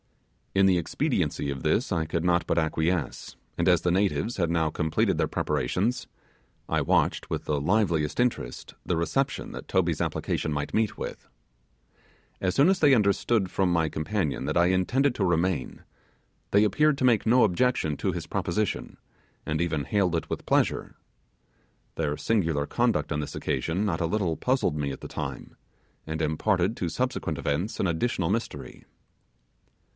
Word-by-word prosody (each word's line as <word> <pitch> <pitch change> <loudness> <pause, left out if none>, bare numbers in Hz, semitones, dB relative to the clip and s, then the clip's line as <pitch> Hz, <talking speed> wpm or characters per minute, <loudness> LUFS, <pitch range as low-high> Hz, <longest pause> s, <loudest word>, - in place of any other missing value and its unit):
In 95 0 +5
the 95 -2 +4
expediency 80 -3 -1
of 70 -2 -5
this - - +1
I 80 - 0
could 80 +1 -2
not 85 -1 +2
but - - 0
acquiesce; 80 0 -1 0.2
and - - +2
as 90 -2 +4
the 90 - +1
natives 100 +5 +1
had 85 -4 0
now 80 -2 +1
completed 80 0 0
their - - +1
preparations, 100 - -1 0.6
I - - +1
watched - - +1
with - - -3
the 75 -2 -1
liveliest 85 -3 +1
interest 125 -1 -1
the 90 - 0
reception 135 +11 -1
that - - -8
Toby's - - +1
application 80 - -2
might 75 -1 -3
meet 110 -1 +1
with. - - -7 1.1
As 90 -1 0
soon 140 +4 +5
as 190 -1 +3
they 145 -3 +6
understood 100 -1 +2
from 95 -1 +1
my 80 -2 +2
companion 80 +1 -2
that - - -1
I 85 - +5
intended 120 +9 +2
to 100 - -1
remain, 85 -4 0 0.7
they 100 +1 +4
appeared 150 +6 +3
to 130 - +1
make 115 -3 +3
no 125 +3 +5
objection 100 -6 +1
to - - -1
his - - -5
proposition, 105 +4 -2 0.5
and 75 0 -1
even 80 -5 -1
hailed 90 +2 +1
it 80 - -3
with - - -5
pleasure. - - +1 1.0
Their 75 -2 -1
singular 80 -10 0
conduct - - 0
on 75 - -1
this 75 - -6
occasion 85 +10 -1
not 85 -5 -1
a 85 - +1
little 90 -3 0
puzzled 130 - 0
me 70 -2 -2
at 65 - -7
the - - -6
time, - - -6 0.5
and 80 +1 -3
imparted 90 +6 +1
to 90 - -2
subsequent 125 - -2
events 85 +12 -2
an 95 - +2
additional 90 +1 0
mystery. 115 +2 -4
90 Hz, 165 wpm, -27 LUFS, 80-105 Hz, 1.1 s, they